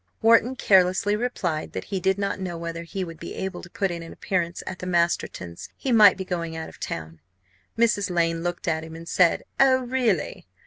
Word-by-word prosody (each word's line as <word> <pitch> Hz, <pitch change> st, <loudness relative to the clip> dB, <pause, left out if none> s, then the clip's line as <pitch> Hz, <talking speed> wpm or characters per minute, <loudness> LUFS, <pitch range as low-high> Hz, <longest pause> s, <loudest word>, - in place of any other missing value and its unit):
Wharton 230 Hz, +3 st, +5 dB
carelessly 190 Hz, -1 st, +3 dB
replied 195 Hz, -9 st, -2 dB
that -, -, -4 dB
he 195 Hz, -2 st, -3 dB
did 190 Hz, +2 st, +1 dB
not 200 Hz, 0 st, -2 dB
know 180 Hz, -3 st, -4 dB
whether 170 Hz, 0 st, -5 dB
he 185 Hz, +3 st, -4 dB
would 165 Hz, -2 st, -8 dB
be -, -, -7 dB
able 190 Hz, -2 st, -4 dB
to 175 Hz, -, -12 dB
put 195 Hz, +1 st, -1 dB
in 170 Hz, -1 st, -5 dB
an 165 Hz, -, -9 dB
appearance 175 Hz, -2 st, -2 dB
at 185 Hz, -, -6 dB
the 180 Hz, -, -5 dB
Mastertons'. 170 Hz, -, -1 dB
He 265 Hz, -, -2 dB
might 215 Hz, -4 st, +7 dB
be 190 Hz, -, -4 dB
going 170 Hz, -3 st, -3 dB
out 160 Hz, 0 st, -5 dB
of -, -, -16 dB
town. 80 Hz, 0 st, -6 dB, 0.6 s
Mrs. 225 Hz, -4 st, +2 dB
Lane 165 Hz, -1 st, +1 dB
looked 175 Hz, +1 st, -4 dB
at 160 Hz, -1 st, 0 dB
him 160 Hz, 0 st, -9 dB
and 165 Hz, +1 st, -10 dB
said, 175 Hz, -2 st, +3 dB, 0.2 s
"Oh, 260 Hz, -1 st, +5 dB
really!" 240 Hz, -, -1 dB
180 Hz, 210 wpm, -25 LUFS, 165-205 Hz, 0.6 s, might